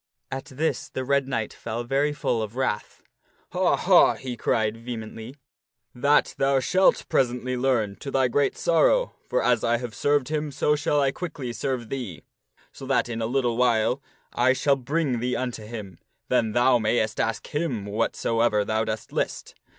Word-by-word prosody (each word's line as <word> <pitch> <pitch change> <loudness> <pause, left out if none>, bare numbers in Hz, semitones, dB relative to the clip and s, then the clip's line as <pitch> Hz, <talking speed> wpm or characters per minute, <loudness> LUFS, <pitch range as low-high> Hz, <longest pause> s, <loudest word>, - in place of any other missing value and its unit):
At 135 0 -4
this 150 +5 -2
the 130 - -4
Red 140 0 +1
Knight 115 -5 -2
fell 115 +2 -5
very 135 +4 +1
full 125 -5 -1
of 110 +1 -5
wrath. 130 -5 -2 0.5
"Ha! - - +2
ha!" - - +5
he 130 -2 -6
cried 110 -2 0
vehemently, 115 +1 -7 0.3
" 125 -1 -58
that 140 +4 +2
thou 135 0 +3
shalt 185 +9 +3
presently 125 0 0
learn 120 -6 0
to 140 - -7
thy 135 -1 +2
great 140 +3 +1
sorrow, - - +3 0.2
for - - +1
as - - +2
I 120 0 +2
have 120 -2 -6
served 145 0 +1
him, 150 -1 -2
so 150 +2 +1
shall 145 0 +1
I 135 -1 +2
quickly 140 -7 -5
serve 125 -3 -3
thee, 120 - -5 0.5
so 135 - -10
that 135 -2 +1
in 115 -1 -3
a 110 - 0
little 120 -2 0
while 125 +1 +2 0.3
I 125 +2 +3
shall 140 +1 +2
bring 140 -1 -1
thee 125 +1 -1
unto 120 -4 -4
him; 105 -6 -8 0.3
then 115 -4 +2
thou 120 +1 +4
mayst 110 0 0
ask 115 - -1
him 145 -10 -1
whatsoever 105 +1 +1
thou 110 +1 0
dost 110 -1 -4
list. - - -3
125 Hz, 175 wpm, -25 LUFS, 115-135 Hz, 0.5 s, ha